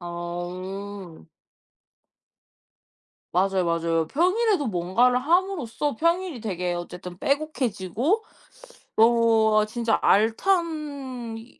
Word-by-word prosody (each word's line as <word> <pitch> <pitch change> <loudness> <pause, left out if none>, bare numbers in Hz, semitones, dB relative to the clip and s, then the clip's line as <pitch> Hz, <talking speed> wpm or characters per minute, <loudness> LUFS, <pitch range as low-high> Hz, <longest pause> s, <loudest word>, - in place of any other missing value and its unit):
아. 175 - -6 2.1
맞아요, 190 0 +2
맞아요. 165 -1 0
평일에도 370 - +2
뭔가를 215 +6 +2
함으로써 300 - 0
평일이 335 -2 0
되게 180 -4 -2
어쨌든 175 +1 -7
빼곡해지고 275 - -1 0.7
너무 225 -1 +4
'어 215 - +4
진짜 230 +1 0
알찬 275 - 0
이 230 +2 -17
225 Hz, 200 characters per minute, -25 LUFS, 180-290 Hz, 2.1 s, 너무